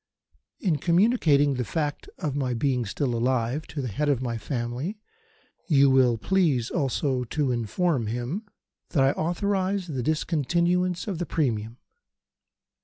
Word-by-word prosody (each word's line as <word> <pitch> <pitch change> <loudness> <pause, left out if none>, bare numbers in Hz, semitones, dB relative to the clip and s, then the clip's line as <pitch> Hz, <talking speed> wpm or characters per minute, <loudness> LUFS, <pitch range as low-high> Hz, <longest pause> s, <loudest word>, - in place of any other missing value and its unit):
"In 175 -7 +1
communicating 170 - +3
the 125 -1 -1
fact 150 +3 -3
of 150 -6 -3
my 130 -4 -1
being 125 -2 0
still 125 +5 -1
alive 125 +4 0
to 145 - -5
the - - -2
head 145 +8 -1
of 140 -4 +2
my 120 -2 -2
family 120 - -3 0.7
you 140 -4 +5
will 125 -3 +4
please 145 - +1
also 135 -3 0
to 140 +2 -1
inform 120 - 0
him 125 - -3 0.4
that 140 -6 +2
I 135 - +4
authorise 190 +4 -1
the 140 -7 -3
discontinuance 170 - 0
of 190 -5 -3
the 175 - -2
premium. 115 -6 -1
140 Hz, 140 wpm, -26 LUFS, 125-170 Hz, 0.7 s, you